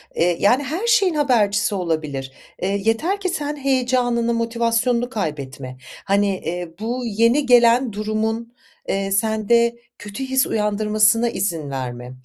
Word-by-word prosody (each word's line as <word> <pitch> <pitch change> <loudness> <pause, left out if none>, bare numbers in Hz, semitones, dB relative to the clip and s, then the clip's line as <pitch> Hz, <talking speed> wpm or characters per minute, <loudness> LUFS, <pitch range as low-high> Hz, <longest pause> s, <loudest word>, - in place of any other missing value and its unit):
Eee, 170 0 +1
yani, 245 +8 +3
her 330 - -3
şeyin 410 -7 +3
habercisi 220 -7 +2
olabilir. 155 -7 -3 0.3
Eee, 195 +2 -1
yeter 315 - +1
ki 380 -2 -2
sen 300 -4 -3
heyecanını, 250 -4 0
motivasyonunu 235 +1 0
kaybetme. 140 - -5 0.3
Hani, 200 +1 +2
eee, 175 0 -5
bu 235 +4 -3
yeni 230 +6 +2
gelen 245 -1 +4
durumun, 220 +2 -2 0.4
eee, 195 0 -1
sende 220 +3 +2 0.2
kötü 205 +5 -7
his 265 0 +1
uyandırmasına 215 +2 +2
izin 170 -9 -3
verme. 125 -2 -5
225 Hz, 125 wpm, -21 LUFS, 195-245 Hz, 0.4 s, gelen